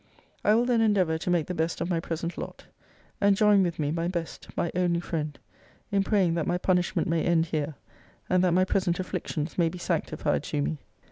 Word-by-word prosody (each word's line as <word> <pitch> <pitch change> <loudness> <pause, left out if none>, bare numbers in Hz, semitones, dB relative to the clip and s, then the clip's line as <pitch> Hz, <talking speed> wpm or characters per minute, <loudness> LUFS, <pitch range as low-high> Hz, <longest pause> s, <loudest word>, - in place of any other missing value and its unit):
I 210 - +5
will 235 +2 +3
then 245 -2 +2
endeavour 185 -7 +2
to 175 - -3
make 175 -3 +2
the 180 - -4
best 165 0 -1
of - - -1
my 175 -2 0
present 165 +1 -4
lot. - - -7 0.6
And 200 -1 +4
join 210 -1 +5
with 175 -3 0
me, 145 -1 -1
my 165 +1 -1
best, 170 -2 -4
my 170 - 0
only 175 -1 +1
friend, 155 -4 -3 0.5
in 200 -1 +2
praying, 190 -4 +2
that 165 -2 -1
my 175 - +1
punishment 180 +1 +1
may 165 -1 +1
end 170 -2 +3
here; 155 -2 -2 0.5
and 185 0 +3
that 175 -2 +3
my 185 0 +4
present 185 -2 0
afflictions 165 -3 -3
may 165 -1 +4
be 180 - -8
sanctified 175 - -1
to - - -2
me. 75 +1 -2
175 Hz, 210 wpm, -27 LUFS, 165-185 Hz, 0.6 s, I